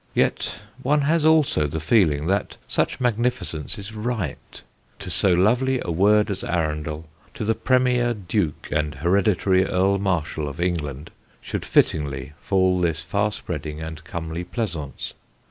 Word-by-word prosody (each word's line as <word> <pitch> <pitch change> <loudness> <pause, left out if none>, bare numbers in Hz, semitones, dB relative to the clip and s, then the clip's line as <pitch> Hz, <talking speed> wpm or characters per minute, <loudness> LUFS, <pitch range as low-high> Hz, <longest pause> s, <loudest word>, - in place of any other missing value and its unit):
Yet - - +1 0.3
one 145 +3 +2
has 155 +2 +2
also 155 - +4
the 80 +3 -3
feeling 80 -4 +3
that 100 +4 -1
such - - 0
magnificence 120 - -1
is 100 +2 -8
right: 110 - -4 0.3
to 95 -2 -6
so 90 +3 +3
lovely 120 +9 +3
a 85 - -3
word 105 +5 +4
as 95 - -4
Arundel, 80 -2 -2 0.3
to - - -3
the 110 - +3
Premier 125 0 +2
Duke 95 -4 -2
and 75 0 0
Hereditary 95 +4 +2
Earl 95 +1 +2
Marshal 85 -5 -1
of 70 - -9
England, 80 -5 -2 0.3
should - - -4
fittingly 70 -2 +1
fall 95 -2 +2
this 80 -2 0
far 100 +5 0
spreading 75 -6 -5
and 80 -1 -7
comely 80 +2 -5
pleasaunce. 85 - -4
90 Hz, 145 wpm, -23 LUFS, 80-110 Hz, 0.3 s, also